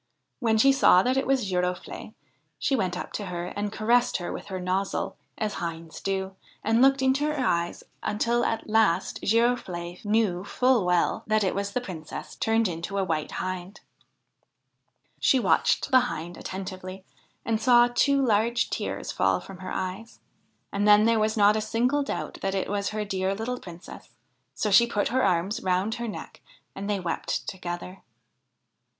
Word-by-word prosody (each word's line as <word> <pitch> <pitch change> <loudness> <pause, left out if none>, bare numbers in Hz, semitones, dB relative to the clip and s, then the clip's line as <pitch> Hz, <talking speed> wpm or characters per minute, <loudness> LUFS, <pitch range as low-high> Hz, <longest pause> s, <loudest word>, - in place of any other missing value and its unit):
When 225 -4 +2
she 275 +5 +6
saw 190 -8 +5
that 255 +1 +1
it 270 - 0
was 265 -4 +2
Girofle'e, 180 -1 -3 0.4
she 275 - +1
went 185 -7 -1
up - - -6
to 205 - -4
her 175 -1 -4
and 205 0 -2
caressed 235 +3 +2
her 175 - -5
with - - -7
her 190 -2 -4
nozzle, 185 +2 -2 0.2
as 215 -1 -2
hinds 165 -1 -6
do, 190 -1 -2 0.3
and 225 +2 +2
looked 270 0 +5
into 265 +3 +2
her 300 - -3
eyes 170 0 -1 0.2
until 235 +3 0
at 225 - -1
last 215 -4 +2
Girofle'e 200 -7 0
knew 205 -4 +1
full 250 -2 +2
well 180 -1 +1
that 215 -1 +2
it 190 - +1
was 200 0 -2
the 250 - 0
Princess 165 -9 -8
turned 225 0 +1
into 175 +3 -4
a 195 - +2
White 160 -4 -2
Hind. 185 +1 -5 1.4
She 265 - +4
watched 265 - +2
the 260 - +8
Hind 175 -8 -4
attentively 185 0 -7 0.4
and 225 -1 0
saw 240 -2 +6
two 275 +3 +2
large 230 +1 +1
tears - - -3
fall - - +2
from 190 -2 -11
her 185 - -6
eyes, 190 +5 -5 0.5
and 200 +1 +1
then 210 0 +7
there 230 0 +3
was 215 +1 +1
not 205 0 +5
a 215 - 0
single 240 +6 +1
doubt 175 - -4
that 195 0 -1
it 195 - -2
was 200 -1 -1
her 215 0 -3
dear 190 -1 -1
little 245 +4 -3
Princess; 175 0 -11 0.5
so 210 - -1
she 235 +4 +7
put 210 -3 0
her 260 +2 +1
arms 185 +2 +1
around 185 +4 0
her 235 0 -4
neck, 210 - -8 0.3
and 200 +1 -5
they 205 -1 0
wept 170 -3 -3
together. 180 0 -6
205 Hz, 175 wpm, -26 LUFS, 185-230 Hz, 1.4 s, the